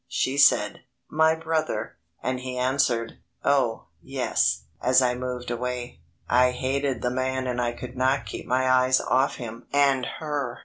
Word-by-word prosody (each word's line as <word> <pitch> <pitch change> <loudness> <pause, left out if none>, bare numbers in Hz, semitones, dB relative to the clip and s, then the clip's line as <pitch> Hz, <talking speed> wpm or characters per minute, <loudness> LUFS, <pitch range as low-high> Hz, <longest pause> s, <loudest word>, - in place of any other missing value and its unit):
She 130 +1 -1
said, 105 -7 +4 0.3
"My 160 +1 +4
brother," 160 -7 -2 0.3
and 130 0 -1
he 125 0 -5
answered: 125 -3 0 0.2
"Oh, 135 -5 +1 0.2
yes," 70 - 0 0.2
as 130 0 +5
I 125 -1 +2
moved 125 -1 -4
away. 125 -4 -4 0.3
I 125 +1 +4
hated 135 +1 -1
the 125 - +1
man 130 +1 -1
and 125 -1 -1
I 120 0 -1
could 125 +1 -9
not 130 +2 +1
keep - - -7
my 130 +1 +1
eyes 130 0 +4
off 130 +2 +1
him 115 -2 -8
and 140 -2 +3
her. 145 -6 -3
130 Hz, 160 wpm, -25 LUFS, 125-135 Hz, 0.3 s, as